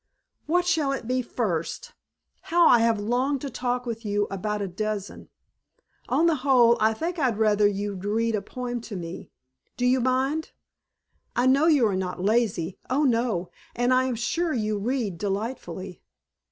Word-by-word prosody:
"What 355 +3 +2
shall 320 -5 +1
it 255 -4 -5
be 255 +1 +1
first? 230 - -3 0.6
How 345 0 +5
I 240 - +6
have 230 -1 +2
longed 250 +6 0
to 280 - -5
talk 245 +1 -2
with 230 -1 -5
you 205 -1 0
about 210 +2 -2
a 200 - -2
dozen. 205 +2 -4 0.8
On 330 - +3
the 330 -2 +3
whole 250 -3 +5
I 220 +1 +4
think 335 +7 -3
I'd 250 -7 +1
rather 210 -1 +4
you'd 200 -1 -3
read 225 +3 0
a 210 - 0
poem 245 +3 -5
to 220 -2 -8
me. 170 -1 -7 0.5
Do 245 - 0
you 255 +1 +4
mind? 260 +5 0 0.8
I 245 - +2
know 275 +5 +4
you 290 -7 +5
are 205 -3 +1
not 185 -1 -3
lazy 195 -4 0
oh, 275 +4 +2
no! 230 -8 0 0.2
and 245 +1 +2
I 255 0 +3
am 255 -2 -1
sure 310 +9 -1
you 215 -3 -1
read 220 -5 -2
delightfully." 195 -3 -4
235 Hz, 170 wpm, -25 LUFS, 205-260 Hz, 0.8 s, I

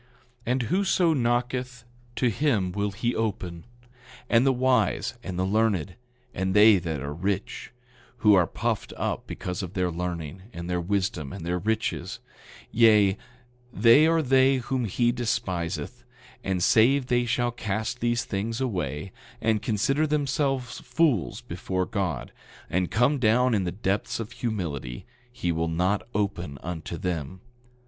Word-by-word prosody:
9:42 120 - -32 0.4
And 125 +1 +1
whoso 180 - +2
knocketh, 125 -1 -1 0.3
to 125 -2 +2
him 110 -9 +1
will 100 +2 -1
he 120 +5 -2
open; 90 -6 -3 0.7
and 120 +3 +5
the - - +5
wise, 130 0 +1
and 95 -6 -6
the 95 - +1
learned, 100 -3 +1 0.4
and 95 +1 -1
they 105 -1 +7
that 80 -5 -4
are 70 +1 -4
rich, 95 +5 -3 0.5
who 105 -1 +5
are 90 -4 +5
puffed - - -2
up - - -2
because 90 +1 -4
of 95 0 -7
their 90 -2 0
learning, 85 0 -4
and 85 0 -6
their 90 -1 -1
wisdom, 90 -6 -1
and 95 -4 -7
their 90 +1 -1
riches—yea, 110 0 +1 0.6
they 115 +8 +6
are 165 -1 +3
they 135 0 +4
whom 125 0 -1
he 120 +4 +1
despiseth; 105 -2 -3 0.4
and 95 -2 -1
save 125 +7 +4
they 120 -1 +2
shall 120 +1 +1
cast 110 +2 -3
these 120 0 0
things 110 +4 -3
away, 90 - -3 0.3
and 110 -2 +1
consider 135 +8 +1
themselves 140 -3 -1
fools 125 -4 0
before 95 -4 -3
God, 95 -4 -3 0.4
and 90 0 +1
come 125 +6 +2
down 125 +2 +3
in 100 -4 +1
the 90 - -1
depths 100 +2 -2
of 115 0 -5
humility, 80 - -4 0.3
he 90 -8 -2
will 80 0 -1
not 90 +5 +1
open 95 -8 -2
unto 85 -1 -5
them. 90 0 -4
105 Hz, 145 wpm, -26 LUFS, 90-125 Hz, 0.7 s, they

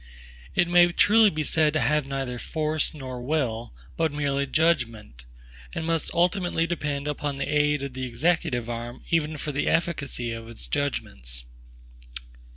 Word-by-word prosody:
It 175 - +4
may 175 0 +6
truly 215 +4 +6
be 155 -4 -2
said 155 0 +2
to 155 - +2
have 150 -2 +2
neither 135 -3 -3
FORCE 155 +1 0
nor 130 -4 -6
WILL, 125 -5 -1 0.2
but 160 -2 +1
merely 140 -1 0
judgment; 115 - 0 0.5
and 160 - -2
must 165 -2 0
ultimately 175 -1 +2
depend 150 -4 -2
upon 145 -1 -2
the 135 - -1
aid 150 -1 +2
of 140 -2 -4
the 130 0 -3
executive 125 -2 0
arm 120 +1 -5
even 155 -2 +1
for 150 - -3
the 145 +1 -1
efficacy 140 -8 0
of 115 0 -6
its 115 - -7
judgments. 65 - -3
145 Hz, 155 wpm, -26 LUFS, 125-160 Hz, 0.5 s, may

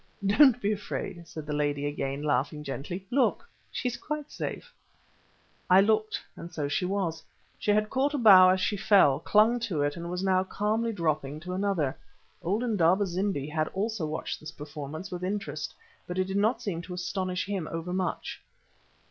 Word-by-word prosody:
"Don't 245 +5 +6
be 205 -2 0
afraid," 180 -4 -4
said 155 -2 -8
the 150 - -3
lady 145 -1 0
again, 145 -1 -3
laughing 150 0 0
gently. 150 +7 -5
"Look, 270 - +2 0.2
she - - -2
is 245 - -2
quite 300 -1 -5
safe." - - -5 1.0
I 185 +1 +8
looked, 215 +2 +2 0.2
and 170 - -9
so 150 -3 -2
she 145 +6 0
was. 180 -4 -1 0.4
She - - -3
had 210 +1 +2
caught 280 +3 +1
a - - +1
bough 190 -7 +8
as 185 +1 +3
she 205 +2 0
fell, 185 -9 +5
clung 220 +3 +4
to 190 -11 -1
it, 145 0 0
and 170 0 -6
was 180 +1 -3
now 190 -1 +3
calmly 215 +4 -1
dropping 155 -6 -1
to 180 +2 -5
another. 185 -8 0 0.5
Old 205 +7 0
Indaba 200 -4 +3
zimbi 185 -5 -1
had 155 0 -1
also 205 -4 -1
watched 155 +1 -4
this 155 0 -8
performance 150 +4 -7
with 180 0 -5
interest, 200 +3 -3 0.4
but 180 - -4
it 185 - +2
did 190 +1 -4
not 215 +5 +1
seem 175 -5 -2
to 180 +1 -7
astonish 185 0 -2
him 195 -5 -3
over 165 +2 -4
much. 185 -2 -3
185 Hz, 180 wpm, -28 LUFS, 155-205 Hz, 1.0 s, I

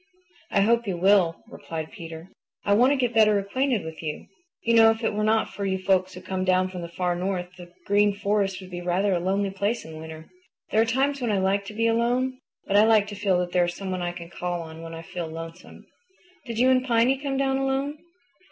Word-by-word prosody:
"I 200 - +2
hope 235 +2 +2
you 185 -3 -1
will," 185 -2 +3
replied 160 0 -7
Peter. 165 -4 -9 0.4
"I 200 - +3
want 245 +6 +5
to - - +3
get 245 -3 0
better 215 -2 +5
acquainted 225 +1 -1
with 160 0 -8
you. 155 -2 -5 0.4
You 230 - +2
know, 225 -1 +7
if 225 +1 -1
it 220 - +1
were 210 +1 -1
not 220 +1 +1
for 200 - -5
you 190 -1 0
folks 185 -1 +1
who 180 - -9
come 190 -1 -2
down 185 0 +2
from 180 -1 -7
the 170 - -6
Far 180 0 -1
North 180 0 -2
the 175 -1 -12
Green 205 0 +3
Forest 200 -1 0
would 185 -1 -12
be 175 0 -5
rather 185 +3 +1
a 175 - +1
lonely 195 +2 0
place 205 +4 -2
in 160 -1 -9
winter. 160 0 -9 0.4
There 220 - +4
are - - +3
times 270 +4 0
when 235 -3 0
I 205 - +1
like 195 +1 +1
to 210 - -8
be 230 +1 +1
alone, 245 +3 +1 0.3
but 200 - +2
I 210 - +7
like 220 -2 +5
to 205 - -6
feel 195 -2 +1
that 175 0 -4
there 175 -1 +3
is 175 - -4
someone 185 -2 -4
I 175 0 -1
can 175 -1 -10
call 175 -1 -3
on 160 0 -10
when 165 0 -8
I 165 - -8
feel 170 0 -5
lonesome. 165 +2 -10 0.6
Did 230 -1 -5
you 255 +2 +4
and 255 0 +3
Piny 250 +1 +2
come 275 -1 -2
down 270 0 +1
alone?" 270 +2 -1
195 Hz, 240 wpm, -25 LUFS, 175-230 Hz, 0.6 s, know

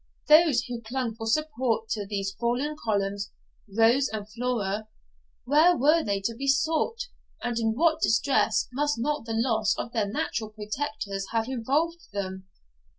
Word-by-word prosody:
Those 305 -5 +6
who 245 -2 -6
clung 240 +1 -3
for 225 0 -6
support 250 -4 0
to 205 -2 -2
these 195 -1 -2
fallen 250 +6 0
columns, 200 -5 -2 0.4
Rose 230 +6 +4
and 210 -2 -5
Flora, 215 -3 -2 0.6
where 315 +6 +5
were 310 +5 +4
they 200 -1 0
to 230 +4 -1
be 275 +4 -5
sought, 320 - +1 0.4
and 240 -1 -1
in 225 -1 +1
what 320 +3 +2
distress 225 -2 +2
must 290 +1 0
not 295 +2 -1
the 225 -1 -3
loss 225 -3 +2
of 235 - -4
their 220 -4 +1
natural 215 +1 -2
protectors 210 -2 -4
have 225 0 +1
involved 300 +7 -1
them? 190 -1 -4
230 Hz, 150 wpm, -27 LUFS, 215-285 Hz, 0.6 s, Those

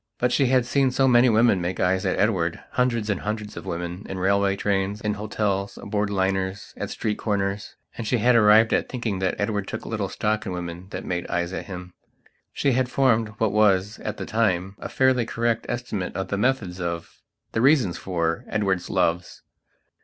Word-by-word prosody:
But 125 0 +1
she 135 0 +3
had 125 -1 +3
seen 135 +1 +2
so 130 +1 +2
many 125 0 +6
women 110 -4 +4
make 90 +2 -3
eyes 95 +1 +1
at 95 - 0
Edwardhundreds 110 +5 0
and 100 -4 0
hundreds 105 0 -4
of 85 - -8
women, 85 +3 -4
in 95 - -4
railway 100 +1 +2
trains, 100 0 -1
in 105 0 -1
hotels, 100 -1 -2
aboard 105 0 -2
liners, 95 0 -1
at - - -5
street 105 -1 -2
corners. 100 -1 -2 0.2
And 115 - -5
she 125 - +2
had 120 +2 +4
arrived 110 0 +6
at - - +1
thinking 115 -6 -3
that 95 -1 0
Edward 100 -1 -1
took - - -5
little 105 -4 -2
stock 110 +2 -1
in 95 -4 -4
women 90 0 -6
that - - -6
made 90 -1 -3
eyes 85 +1 -2
at - - -5
him. 90 -2 -8 0.6
She 140 - +1
had 125 0 +1
formed 115 -5 +2
what 110 -2 +1
was, 105 -1 +2
at 105 - -5
that - - -5
time, 95 -4 0
a - - -6
fairly 130 -2 +3
correct 115 0 -1
estimate 115 -8 -3
of 95 0 -3
the - - 0
methods 105 -7 0
of, 85 -1 -5 0.3
the 110 - 0
reasons 130 - +3
for, 85 -3 -1
Edward's 95 -4 -1
loves. 85 +2 -1
105 Hz, 190 wpm, -24 LUFS, 95-115 Hz, 0.6 s, many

